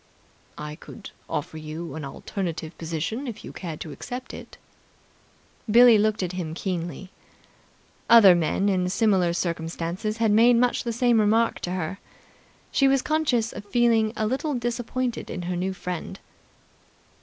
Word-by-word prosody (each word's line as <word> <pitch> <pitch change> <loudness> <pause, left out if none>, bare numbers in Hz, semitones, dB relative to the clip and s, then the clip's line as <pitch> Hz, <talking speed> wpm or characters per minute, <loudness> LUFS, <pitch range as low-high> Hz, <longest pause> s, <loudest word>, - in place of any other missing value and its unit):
"I 150 0 -7
could 210 +4 -11 0.2
offer 150 +2 -4
you 155 +2 -7
an 160 - -6
alternative 165 +3 -5
position, 165 - -3
if 230 - -7
you - - -9
cared 165 -4 -6
to 155 - -6
accept 250 - -7
it." - - -10 1.1
Billie 235 0 +7
looked 215 -1 +1
at 180 - -2
him 170 -3 -5
keenly. 180 +1 -4 1.0
Other 225 -5 +9
men 175 +4 +1
in 185 -2 +1
similar 190 -4 +2
circumstances 170 +4 -3
had 225 -2 +2
made 235 +3 +6
much 245 +1 +1
the 235 - -1
same 240 0 +3
remark 225 +2 +2
to 180 - -4
her. 185 +2 -3 0.7
She 275 - +3
was 270 -1 +3
conscious 280 -8 +1
of - - -7
feeling 225 0 +2
a 215 - 0
little 270 +6 -1
disappointed 240 +1 -3
in 180 - -5
her 180 +1 -3
new 185 +2 -1
friend. 180 -2 -6
200 Hz, 150 wpm, -25 LUFS, 170-235 Hz, 1.1 s, Other